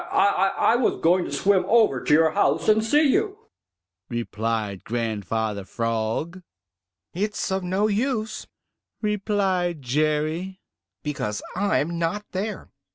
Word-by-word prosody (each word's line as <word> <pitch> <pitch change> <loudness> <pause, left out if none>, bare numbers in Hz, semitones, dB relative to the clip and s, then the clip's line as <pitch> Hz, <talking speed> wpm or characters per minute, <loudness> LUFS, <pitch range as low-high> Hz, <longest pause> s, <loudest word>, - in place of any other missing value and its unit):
"I 195 -1 +3
I 230 - +4
was 245 - +1
going 175 +2 +3
to - - -6
swim 190 +7 +2
over 220 - +3
to - - -1
your 160 +1 +5
house 200 - +1
to 215 0 +4
see 290 +8 +3
you," 410 +6 +1 0.7
replied 110 -4 -3
Grandfather 110 -2 -2
Frog. 115 - -2 0.7
"It's 205 +2 -2
of 190 0 -1
no 190 +3 0
use," 220 +1 -1 0.6
replied 195 -6 0
Jerry, 155 +7 -1 0.4
"because 120 -8 -3
I'm 170 -4 0
not 190 +5 -1
there. 205 +2 -4
175 Hz, 120 wpm, -24 LUFS, 125-205 Hz, 0.7 s, your